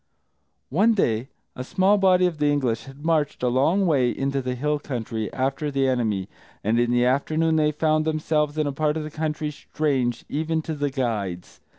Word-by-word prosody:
One 215 Hz, -, +4 dB
day, 120 Hz, -, +1 dB, 0.3 s
a 125 Hz, -, -5 dB
small 190 Hz, +9 st, +2 dB
body 185 Hz, -1 st, +4 dB
of 170 Hz, -4 st, -1 dB
the 150 Hz, -, +2 dB
English 130 Hz, -6 st, 0 dB
had 135 Hz, +3 st, -12 dB
marched 155 Hz, -5 st, 0 dB
a 125 Hz, -, +3 dB
long 160 Hz, +11 st, +2 dB
way 135 Hz, -7 st, +3 dB
into 135 Hz, +2 st, -1 dB
the 125 Hz, -1 st, -3 dB
hill 150 Hz, +3 st, -1 dB
country, 115 Hz, -6 st, -4 dB
after 135 Hz, +3 st, -1 dB
the 135 Hz, -1 st, +1 dB
enemy, 110 Hz, -7 st, 0 dB, 0.4 s
and 110 Hz, +3 st, +2 dB
in 120 Hz, 0 st, +2 dB
the 120 Hz, 0 st, +3 dB
afternoon 155 Hz, +5 st, +1 dB
they 150 Hz, -1 st, +3 dB
found 155 Hz, +1 st, +1 dB
themselves 155 Hz, -1 st, 0 dB
in 155 Hz, -, +1 dB
a 145 Hz, -, -1 dB
part 150 Hz, +2 st, 0 dB
of 155 Hz, -, -3 dB
the 155 Hz, -, -7 dB
country 155 Hz, 0 st, -2 dB
strange 135 Hz, -5 st, -2 dB
even 160 Hz, +2 st, -1 dB
to 160 Hz, -, -4 dB
the 145 Hz, -1 st, -1 dB
guides. 110 Hz, -10 st, -3 dB
145 Hz, 195 wpm, -24 LUFS, 125-155 Hz, 0.4 s, One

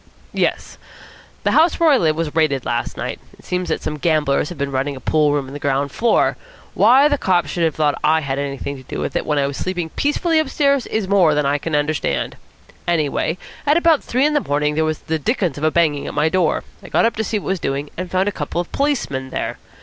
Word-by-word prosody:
"Yes. -, -, -1 dB, 0.6 s
The -, -, +2 dB
house 325 Hz, +2 st, +4 dB
where 330 Hz, -2 st, +5 dB
I 275 Hz, -, +5 dB
live 160 Hz, -7 st, +2 dB
was 160 Hz, -1 st, -3 dB
raided 145 Hz, -5 st, +1 dB
late -, -, -1 dB
last 120 Hz, 0 st, -2 dB
night. -, -, -4 dB, 0.2 s
It -, -, -20 dB
seems 180 Hz, 0 st, -2 dB
that -, -, -2 dB
some 150 Hz, -, -3 dB
gamblers 150 Hz, -2 st, +1 dB
have 175 Hz, -, -8 dB
been 140 Hz, 0 st, -2 dB
running 135 Hz, +2 st, -1 dB
a -, -, -8 dB
pool 150 Hz, +3 st, +2 dB
room 145 Hz, -2 st, 0 dB
on 135 Hz, -, -10 dB
the 145 Hz, -, -6 dB
ground 140 Hz, 0 st, 0 dB
floor. 235 Hz, +8 st, +2 dB, 0.4 s
Why 270 Hz, +4 st, +6 dB
the 290 Hz, -2 st, 0 dB
cops 175 Hz, -6 st, +1 dB
should 175 Hz, -, -1 dB
have 160 Hz, -3 st, +1 dB
thought 150 Hz, -2 st, +1 dB
I 160 Hz, +1 st, +3 dB
had 140 Hz, -2 st, -2 dB
anything 140 Hz, 0 st, -4 dB
to -, -, -11 dB
do -, -, -4 dB
with -, -, -3 dB
it, -, -, -1 dB
when 150 Hz, -, +1 dB
I 140 Hz, -, +2 dB
was 140 Hz, 0 st, -4 dB
sleeping 180 Hz, -3 st, -3 dB
peacefully 315 Hz, +3 st, +1 dB
upstairs, 280 Hz, -3 st, +1 dB
is 215 Hz, -3 st, -2 dB
more 185 Hz, -6 st, +4 dB
than 150 Hz, -1 st, +1 dB
I 145 Hz, +1 st, +1 dB
can 160 Hz, +1 st, -2 dB
understand. 150 Hz, +1 st, -1 dB, 0.5 s
Anyway, 160 Hz, 0 st, 0 dB, 0.3 s
at 295 Hz, +2 st, +3 dB
about 335 Hz, -3 st, +3 dB
three 255 Hz, +4 st, +1 dB
in 300 Hz, -, +2 dB
the 295 Hz, -, +3 dB
morning 150 Hz, -, 0 dB
there 160 Hz, +1 st, +1 dB
was 155 Hz, -1 st, -1 dB
the 160 Hz, 0 st, -2 dB
dickens 180 Hz, -, -1 dB
of -, -, -7 dB
a 155 Hz, -, +4 dB
banging 155 Hz, -3 st, +1 dB
at -, -, -6 dB
my 150 Hz, +2 st, +2 dB
door. 175 Hz, -2 st, +1 dB, 0.2 s
I -, -, -12 dB
got -, -, +3 dB
up 230 Hz, -, +1 dB
to 220 Hz, -, 0 dB
see 220 Hz, -, -1 dB
what 205 Hz, -, -6 dB
was 190 Hz, -1 st, 0 dB
doing, 140 Hz, 0 st, -3 dB
and 180 Hz, 0 st, -5 dB
found 185 Hz, +2 st, +1 dB
a -, -, +1 dB
couple 160 Hz, -2 st, -4 dB
of 175 Hz, -, -4 dB
Policemen 240 Hz, -, -1 dB
there. -, -, -4 dB
160 Hz, 250 wpm, -20 LUFS, 145-205 Hz, 0.6 s, Why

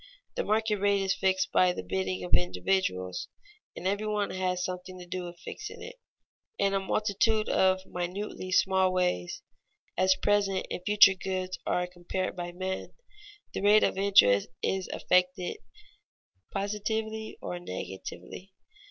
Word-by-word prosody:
_ -, -, -21 dB, 0.3 s
The -, -, 0 dB
market 215 Hz, 0 st, +1 dB
rate 200 Hz, 0 st, +2 dB
is 190 Hz, 0 st, +2 dB
fixed 190 Hz, -1 st, +1 dB
by 180 Hz, -1 st, +4 dB
the -, -, -5 dB
bidding 95 Hz, 0 st, -2 dB
of 90 Hz, 0 st, -6 dB
individuals, 90 Hz, -, 0 dB, 0.5 s
and 180 Hz, -, -3 dB
every 205 Hz, +2 st, 0 dB
one 210 Hz, -1 st, 0 dB
has 180 Hz, -1 st, -1 dB
something 185 Hz, 0 st, -6 dB
to 180 Hz, -, -9 dB
do 180 Hz, 0 st, -4 dB
with 175 Hz, 0 st, -9 dB
fixing -, -, -7 dB
it. -, -, -9 dB, 0.6 s
In 195 Hz, 0 st, +2 dB
a 195 Hz, -, +2 dB
multitude 215 Hz, +2 st, +1 dB
of 190 Hz, 0 st, +2 dB
minutely 185 Hz, +1 st, -4 dB
small 190 Hz, 0 st, +3 dB
ways, 180 Hz, -, -1 dB, 0.5 s
as 185 Hz, 0 st, +4 dB
present 195 Hz, -1 st, +1 dB
and -, -, -3 dB
future 205 Hz, -2 st, +8 dB
goods 185 Hz, -1 st, -4 dB
are 180 Hz, -, +1 dB
compared 180 Hz, +1 st, -4 dB
by 175 Hz, -1 st, -4 dB
men, 185 Hz, +1 st, -4 dB, 0.6 s
the -, -, -3 dB
rate 210 Hz, +2 st, +6 dB
of -, -, +2 dB
interest 190 Hz, -, +5 dB, 0.2 s
is 190 Hz, -1 st, 0 dB
affected 180 Hz, 0 st, +1 dB, 0.9 s
positively 220 Hz, +2 st, -3 dB
or 175 Hz, -, -5 dB
negatively. 95 Hz, -, -7 dB
185 Hz, 145 wpm, -29 LUFS, 180-200 Hz, 0.9 s, future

